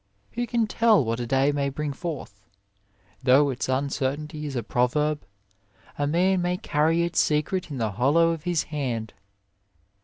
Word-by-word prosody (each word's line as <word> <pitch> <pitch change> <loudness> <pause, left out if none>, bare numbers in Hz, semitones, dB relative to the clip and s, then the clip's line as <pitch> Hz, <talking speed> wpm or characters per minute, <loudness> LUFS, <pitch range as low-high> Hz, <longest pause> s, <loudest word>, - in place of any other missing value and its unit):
Who 240 +1 -3
can 230 0 +1
tell 220 - +3
what 115 +1 -2
a 120 - -3
day 135 +3 +3
may 140 -1 -1
bring 145 +1 -3
forth? 135 - -7 0.8
Though 135 +2 +4
its 130 0 -4
uncertainty 145 +3 -2
is 140 - -5
a 120 - -2
proverb, 145 +7 0 0.7
a 145 - -1
man 180 +4 +2
may 180 +1 0
carry 160 +1 +1
its 170 - 0
secret 165 +4 0
in 140 - -5
the 110 -3 -1
hollow 140 +11 +3
of 165 -2 -4
his 170 -1 0
hand. 125 -8 -4
145 Hz, 160 wpm, -25 LUFS, 130-165 Hz, 0.8 s, Though